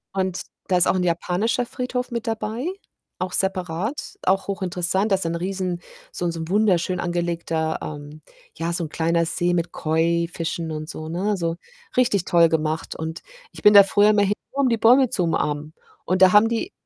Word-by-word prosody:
Und 190 -1 -1 0.2
da 185 - +2
ist 180 - +4
auch - - +3
'n 185 - 0
japanischer 180 +8 0
Friedhof 250 +1 -4
mit 235 -1 -4
dabei, 225 +3 -3 0.5
auch 185 0 -3
separat, 190 - -2
auch 190 0 +2
hochinteressant. 190 +1 -1
Da - - +6
ist 190 - -3
ein 165 0 -1
riesen, 180 0 -3 0.3
so 175 - -4
'n 170 - 0
so 165 - -6
'n 160 - -5
wunderschön 185 -3 +2
angelegter, 170 -2 -2
ähm 150 0 -8 0.3
ja, 165 +1 -2
so 170 - -1
'n - - -8
kleiner 170 +2 +1
See 175 +2 0
mit 170 0 -1
Koi-Fischen 165 +1 -1
und 155 0 -5
so, 155 0 -7
ne, 180 +5 -2
also, 170 -4 -1 0.4
richtig 210 -8 +2
toll 170 -1 +5
gemacht 155 0 -2
und 160 +1 -5 0.3
ich - - -12
bin 210 - +7
da 200 -1 +10
früher 205 +2 +4
immer 210 -1 +3
hin, 200 0 +2 0.2
nur 280 - 0
um 265 - +3
die 230 - +1
Bäume 245 +3 +5
zu 185 - 0
umarmen 150 -2 -1 0.3
und 185 +1 0
da 185 -1 +8
haben 210 +2 +6
die 235 - -2
180 Hz, 195 wpm, -23 LUFS, 165-205 Hz, 0.5 s, da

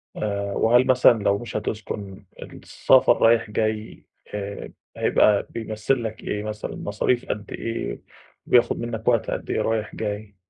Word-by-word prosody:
آآ 100 -1 -2
وهل 120 +5 +3
مثلًا 125 -4 +5
لو 100 0 +2
مش 115 +1 -5
هتسكن 100 -3 -5 0.2
السفر - - +2
رايح 115 -1 +4
جاي 110 0 -2 0.3
آآ 100 -1 -5 0.3
هيبقى 105 -1 +3
بيمثّل 110 +3 -2
لك 110 +1 -6
إيه 105 0 -3
مثلًا؟ 105 0 -5
مصاريف 120 +4 -1
قد 105 0 -4
إيه؟ 115 0 -4 0.4
بياخد 120 -1 +3
مِنّك 115 -2 -5
وقت 115 -4 +2
قد - - -5
إيه - - 0
رايح 110 -1 -2
جاي؟ 105 -1 -5
110 Hz, 145 wpm, -23 LUFS, 105-115 Hz, 0.4 s, مثلًا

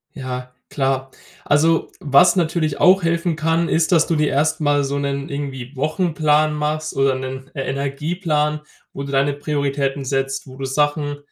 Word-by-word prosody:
Ja, 125 -2 -6 0.2
klar. 135 -1 -1 0.3
Also, 160 +3 +2
was 170 +6 +5
natürlich 160 -4 0
auch 190 +2 +6
helfen 170 0 0
kann, 165 +2 +1
ist, 165 +2 +1
dass 165 -2 +5
du 165 - 0
dir 150 -1 +2
erst 155 +3 +1
mal 145 -1 +2
so 140 +1 -2
'nen 140 0 -2
irgendwie 140 -2 -5
Wochenplan 155 0 +1
machst 150 +1 -2
oder 135 -1 +2
'nen 130 +1 -6
Energieplan, 150 +3 -1 0.3
wo - - -6
du 140 - -6
deine 140 +1 +2
Prioritäten 140 -1 -2
setzt, 135 +1 -2
wo 130 -1 -12
du 135 - -5
Sachen 145 +1 0
145 Hz, 160 wpm, -20 LUFS, 135-155 Hz, 0.3 s, auch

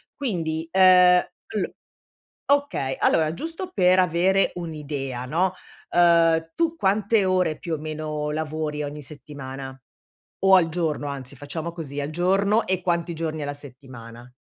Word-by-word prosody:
Quindi, 165 - -2
ehm, 180 -1 +6 0.3
all - - -3 0.7
okay, 280 - +1
allora 160 0 +2
giusto 330 - -5
per 185 - +4
avere 185 +2 +3
un'idea, 145 -7 -5
no, 180 +7 0 0.4
uhm, 165 -2 +4
tu 335 -1 0
quante 205 -1 +2
ore 180 -4 +1
più 170 - -4
o 160 - 0
meno 155 -1 -4
lavori 155 -1 -3
ogni 145 +1 -6
settimana? 135 -2 -8 0.7
O 195 - +7
al 170 -3 +4
giorno 155 -3 -2
anzi, 140 -1 -6
facciamo 155 +4 -5
così, 145 -4 -5
al 145 - -3
giorno 195 +6 +2
e 185 -1 0
quanti 170 -1 -1
giorni 160 -1 -4
alla 145 0 -3
settimana? 125 -4 -11
160 Hz, 135 wpm, -24 LUFS, 145-185 Hz, 0.7 s, O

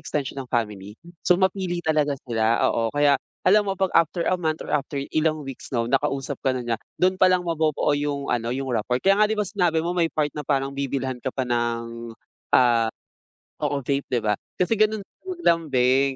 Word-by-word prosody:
extension 140 -2 -3
ng 130 - -8
family. 105 -3 -3 0.2
So 180 - +3
mapili 190 -2 -1
talaga 150 -3 +1
sila, 115 -1 +1
oo, 115 0 0
kaya 145 +2 +3 0.2
alam 205 +2 +4
mo 195 - -1
'pag 190 0 0
after 165 +1 +2
a 185 -1 0
month 155 -1 -1
or - - -6
after 145 0 -1 0.2
ilang 155 -1 +1
weeks 135 -2 -8
'no, 120 -3 0
nakausap 135 +1 -1
ka 130 - +2
na 125 - -4
niya, 120 -1 0 0.2
dun 185 +1 +1
palang 185 -1 +4
mabubuo 155 -3 +1
yung 145 -2 -1
ano, 115 -1 -1
yung 130 0 -3
rapport, 125 +3 0
kaya 195 +2 +4
nga 210 - +5
'di 220 - -1
ba 210 - +2
sinabi 175 -5 +1
mo 175 - -1
may 170 -2 +2
part 150 -2 -1
na 150 - -4
parang 135 -1 0
bibilhan 135 -2 -3
ka 130 - -3
pa 130 0 -2
ng, 115 -1 -2 0.5
ah 120 -3 +4 0.7
oo 140 -2 -1
vape, 140 +2 -1
'di 120 -3 -1
ba? 105 - +2 0.2
Kasi 210 +4 0
ganun 215 -1 +2
sila 380 - -26
maglambing, 135 - +2
140 Hz, 200 wpm, -24 LUFS, 125-175 Hz, 0.7 s, nga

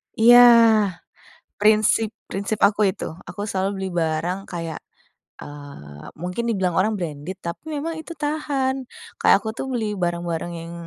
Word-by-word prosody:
Iya. 240 +2 +7 1.2
Prinsip 215 +1 +3 0.2
prinsip 200 +2 -3
aku 210 +1 -2
itu. - - -7 0.2
Aku 205 +4 -5
selalu 190 -1 -1
beli 190 0 -3
barang 165 +4 -1
kayak, 165 -3 -5 0.6
eee, 140 - -11
mungkin 180 +8 -4
dibilang 190 -6 0
orang 215 +3 +2
branded, 170 -2 -5
tapi 170 0 -6
memang 320 +2 -4
itu 325 +2 -8
tahan. 280 -4 -2 0.3
Kayak - - +5
aku, 220 - -4
tuh, - - -4
beli 215 -5 -2
barang-barang 175 -1 -2
yang, 165 0 -8
190 Hz, 140 wpm, -22 LUFS, 170-225 Hz, 1.2 s, Iya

